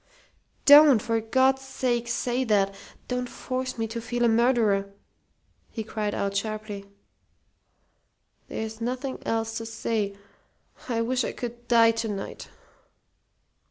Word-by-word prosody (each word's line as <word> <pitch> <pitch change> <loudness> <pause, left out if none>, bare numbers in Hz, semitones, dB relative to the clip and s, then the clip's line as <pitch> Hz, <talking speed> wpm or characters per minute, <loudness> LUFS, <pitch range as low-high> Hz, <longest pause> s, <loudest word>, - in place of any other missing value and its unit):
"Don't, 290 -4 +9
for 225 +1 -1
God's 260 +4 +2
sake, 245 -3 -2
say 245 +1 -1
that! 200 -3 +2 0.3
Don't 250 0 -2
force 255 -1 -4
me 225 - -1
to 230 +1 -4
feel 240 +1 -1
a - - +5
murderer!" 225 -4 +2 0.8
he 220 - -5
cried 210 -1 -3
out, 200 0 -2
sharply. 210 -1 -4 1.6
"There's 220 +1 -5
nothing 255 +3 -3
else 225 0 -1
to 225 - -6
say. 220 -2 -2 0.7
I 230 -2 0
wish 255 +2 0
I - - -3
could 240 0 -7
die 230 -1 +6
to 225 0 -3
night." 200 -2 -6
230 Hz, 125 wpm, -26 LUFS, 220-250 Hz, 1.6 s, Don't